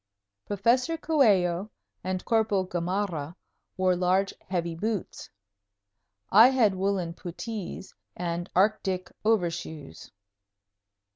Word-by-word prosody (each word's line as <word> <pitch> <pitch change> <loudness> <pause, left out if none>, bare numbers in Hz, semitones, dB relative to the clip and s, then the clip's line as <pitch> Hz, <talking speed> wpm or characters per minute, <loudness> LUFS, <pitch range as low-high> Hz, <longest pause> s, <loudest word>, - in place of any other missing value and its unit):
Professor 240 - +1
Coello 210 - +2 0.3
and 185 0 -3
Corporal 220 -4 +2
Gamarra 175 -3 -2 0.4
wore 185 -1 +3
large, 185 +2 +1
heavy 170 -2 -2
boots. 210 +3 -4 1.0
I 220 +5 +9
had 250 -6 +3
woolen 190 -3 -1
puttees 190 +3 -7 0.2
and 175 0 -3
"Arctic" 190 -1 +1
overshoes. 170 - -2
190 Hz, 85 wpm, -27 LUFS, 175-215 Hz, 1.0 s, I